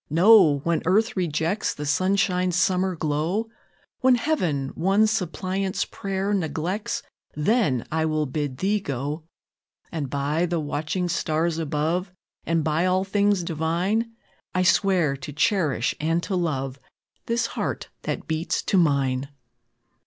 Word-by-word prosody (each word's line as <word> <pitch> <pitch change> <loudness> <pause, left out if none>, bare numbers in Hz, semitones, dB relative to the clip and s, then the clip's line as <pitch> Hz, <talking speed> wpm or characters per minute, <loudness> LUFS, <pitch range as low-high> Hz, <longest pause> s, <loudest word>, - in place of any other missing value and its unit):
No! 170 -3 +6
When 170 -1 +1
earth 215 +6 +2
rejects 170 +2 -1
The 150 - -5
sunshine's 185 +2 +1
summer 185 0 +2
glow, 160 +8 -1 0.5
When 255 0 +5
Heaven 180 - 0
one 195 +8 +2
suppliant's 190 -2 -1
prayer 195 +1 -3
neglects, 185 +5 -2 0.3
Then 150 - +1
will 155 -1 +1
I 140 - -5
bid 145 -3 -2
thee 200 +6 +1
go. 145 -1 -4 0.7
And, 150 -5 -3
by 145 +5 0
the 170 -1 -1
watching 155 +4 -2
stars 165 -1 0
above, 165 +4 -1 0.4
And 165 -1 +1
by 160 +4 +1
all 185 +1 +2
things 200 -1 +1
divine, 175 +8 -1 0.4
I 185 - +3
swear 185 -6 +3
to 135 +2 -7
cherish 150 - +1
and 165 +3 0
to 195 - -2
love 135 -6 -2 0.5
This 230 0 +1
heart - - -3
that - - -4
beats 160 +1 -1
to 195 - +2
mine!" 140 -4 +1
170 Hz, 130 wpm, -24 LUFS, 150-195 Hz, 0.7 s, No